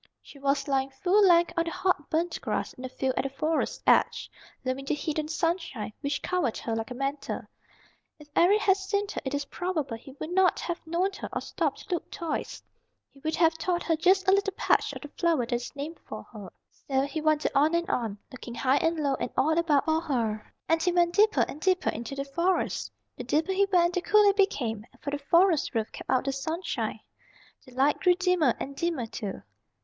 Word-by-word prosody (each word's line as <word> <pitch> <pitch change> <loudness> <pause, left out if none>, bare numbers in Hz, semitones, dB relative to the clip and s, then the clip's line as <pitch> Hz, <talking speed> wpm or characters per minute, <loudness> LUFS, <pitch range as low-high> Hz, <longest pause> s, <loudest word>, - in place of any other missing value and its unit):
She 280 - -14
was 275 +2 0
lying 270 -1 +1
full 365 +9 +2
length 345 -1 +5
on 335 -1 +1
the - - -2
hot 370 -6 0
burnt 335 +2 -1
grass - - -2
in - - -13
the 260 - -5
field 260 0 -1
at - - +2
the 275 - -2
Forest's 310 +4 -1
edge, - - +3 0.3
loving 255 +1 -2
the 290 - 0
heat 310 +1 -2
and 305 0 -3
sunshine, 330 - -2
which 285 0 -2
covered 360 -11 0
her 225 - -3
like 225 0 -3
a 250 - -6
mantle. 275 +2 -3 0.8
If 300 -1 -15
Eric 400 +5 +5
had 390 -2 +4
seen 400 +1 -1
her - - -4
it 270 +1 -2
is 285 0 -2
probable 315 -8 -3
he 255 +4 -12
would 310 +4 -7
not 370 0 +3
have 345 -1 -3
known 350 +4 +1
her - - -5
or - - -2
stopped - - -3
to - - -2
look 345 - -3
twice. 335 -2 -4 0.5
He 275 - -19
would 315 +3 -2
have 330 -1 +4
thought 350 +2 -1
her 325 - +2
just 375 +5 +3
a - - +6
little 395 0 +2
patch - - +2
of - - -8
the - - -6
flower 325 -6 +1
that 245 - -4
is 240 +4 -3
named 295 +4 -6
for - - -8
her. 205 -4 -8 0.4
So 265 -1 +2
he 285 +3 -3
wandered 310 -1 +2
on 300 +4 +3
and 340 0 0
on, 225 -4 -1
looking 240 -2 -8
high 265 +2 +2
and 325 +3 +1
low 285 -2 +1
and - - -2
all 315 +3 +3
about 320 -4 +2
for 315 0 +2
her, 225 -8 -2 0.2
and 325 0 +2
he 360 - +2
went 345 -1 +2
deeper 425 +2 +4
and 300 - -9
deeper 370 0 +2
into 235 +4 -6
the 275 0 -3
Forest. 340 +7 0 0.3
The - - -5
deeper 320 +5 +1
he 395 +1 +3
went 350 -1 +4
the 360 - 0
cooler 420 +1 +5
it - - -8
became, 240 - +1 0.2
for 285 - -4
the 290 - -2
forest 335 -1 +3
roof 220 -1 -1
kept - - -10
out 255 - +3
the 275 - +1
sunshine. 315 +7 -3 0.7
The 250 - -15
light 275 +3 +3
grew 360 -2 +4
dimmer 360 -8 +2
and 275 +1 -5
dimmer 325 -5 -1
too. 210 -3 -6
315 Hz, 225 wpm, -28 LUFS, 275-355 Hz, 0.8 s, a